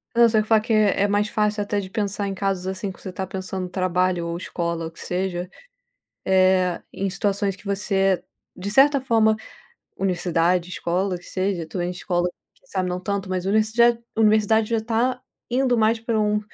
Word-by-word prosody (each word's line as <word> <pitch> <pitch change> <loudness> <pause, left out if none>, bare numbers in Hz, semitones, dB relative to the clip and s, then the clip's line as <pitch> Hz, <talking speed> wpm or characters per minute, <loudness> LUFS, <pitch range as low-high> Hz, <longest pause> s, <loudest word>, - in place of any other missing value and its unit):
Eu 235 0 +7
só 220 -1 +3
ia - - +1
falar 215 0 +3
que 225 +1 -1
é 205 -2 +3
mais 205 +1 +1
fácil, 210 -1 0
até 205 0 -1
de 190 -2 -6
pensar 200 0 -2
em 195 - -3
casos, 195 -1 -2
assim, 190 +1 -3
que - - -15
você - - -7
está 190 +1 -5
pensando 190 -1 -4
trabalho 185 -1 0
ou 170 0 -3
escola, 170 -2 -3
o - - -9
que 165 - -16
seja, 180 0 -2 0.8
eh, 185 -1 +3
em 195 - -2
situações 200 0 0
que 210 +2 -19
você 195 -1 +1 0.3
de 190 +2 -5
certa 275 +4 +5
forma, 225 -4 +3 0.6
universidade, 180 -2 +1
escola, 180 +1 -1
que 175 - -18
seja, 185 -3 -2
também, 175 +2 -3
em - - -2
escola, 180 -1 -1 0.3
quem - - -31
sabe, 185 -2 -1
não 180 0 -3
tanto, 200 0 -3
mas 185 -1 -2
universi 215 +2 +2 0.4
universidade, 220 0 +3
já 230 - +1
está 230 +3 0 0.3
indo 250 0 +2
mais 225 0 +3
para 225 -1 -1
um, 210 0 +1
195 Hz, 190 wpm, -23 LUFS, 185-215 Hz, 0.8 s, Eu